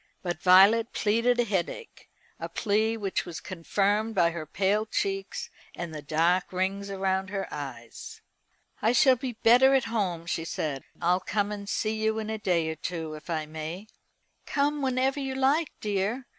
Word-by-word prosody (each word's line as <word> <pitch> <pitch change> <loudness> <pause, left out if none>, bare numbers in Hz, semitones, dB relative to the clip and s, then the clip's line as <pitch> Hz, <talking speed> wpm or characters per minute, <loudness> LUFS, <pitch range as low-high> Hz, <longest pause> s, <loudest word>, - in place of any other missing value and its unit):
But 175 -2 -3
Violet 200 +6 +6
pleaded 230 +3 +2
a - - +5
headache, 210 - -4 0.3
a - - -5
plea 220 +1 0
which 200 -3 -2
was 170 -2 -7
confirmed 205 +4 -1
by 170 -3 +4
her 160 -2 -6
pale 200 +6 +1
cheeks 405 - -3 0.2
and 170 -2 -5
the 155 - -6
dark 165 +5 +1
rings 195 +2 -2
round 190 -1 -1
her 195 0 -3
eyes. 125 -6 -8 0.6
"I 225 +3 +3
shall 260 +1 +6
be 250 0 -5
better 250 +4 +5
at 265 - +3
home," 180 -7 -1
she 170 -1 -2
said. 150 -4 -3
"I'll 175 +2 +2
come 205 +1 -1
and 200 -1 -6
see 215 +1 0
you 220 0 +1
in 220 0 -3
a 220 - -3
day 175 -5 +1
or 160 - -3
two, 160 -1 -5
if 155 +2 -11
I 160 -2 -1
may." 160 +5 -6 0.6
"Come 290 +1 0
whenever 265 +1 +1
you 270 -1 -3
like, 280 +4 +2
dear. 210 +5 -1
200 Hz, 170 wpm, -27 LUFS, 175-230 Hz, 0.6 s, Violet